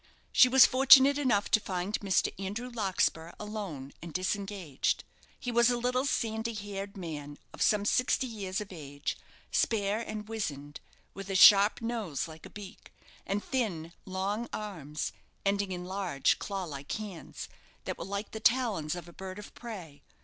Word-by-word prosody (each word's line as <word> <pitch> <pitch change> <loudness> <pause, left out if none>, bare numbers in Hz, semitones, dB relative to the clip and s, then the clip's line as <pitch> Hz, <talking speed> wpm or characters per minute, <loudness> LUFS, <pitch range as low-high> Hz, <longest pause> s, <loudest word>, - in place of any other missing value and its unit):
She 255 - +7
was 265 0 +9
fortunate 270 +2 +7
enough 235 -8 +1
to 220 - +6
find 190 +1 -2
Mr. 195 -3 +1
Andrew 230 +6 -4
Larkspur 185 -6 0
alone, 200 -11 -6
and 170 - -8
disengaged. 185 -4 -1 0.4
He 245 - -3
was 235 0 +5
a 245 - +1
little, 250 +2 0
sandy 225 -2 -1
haired 200 -1 -6
man, 145 -5 -6 0.2
of - - -9
some 205 -1 +3
sixty 255 +4 +2
years 200 -6 -4
of 210 -2 -7
age, 145 -3 -5 0.4
spare 210 -1 +1
and 215 -2 -5
wizened, 145 -10 -4 0.3
with 195 0 -8
a 195 - -2
sharp 200 +3 +8
nose, 220 - -2
like 160 0 -11
a - - -16
beak, 205 -2 -11 0.4
and 200 +1 -1
thin, 180 -11 -2
long 200 +5 -2
arms, 160 -9 -4 0.3
ending 200 -1 +1
in 180 -1 -4
large, 185 -7 0
claw 195 -2 -3
like 140 -4 -7
hands, 210 -5 -6 0.4
that - - -5
were - - -3
like 200 +2 -4
the 220 - -5
talons 215 -10 +2
of 175 -1 -8
a 170 - -13
bird 190 +1 -7
of 210 - -10
prey. 180 -12 -9
200 Hz, 165 wpm, -30 LUFS, 175-220 Hz, 0.4 s, was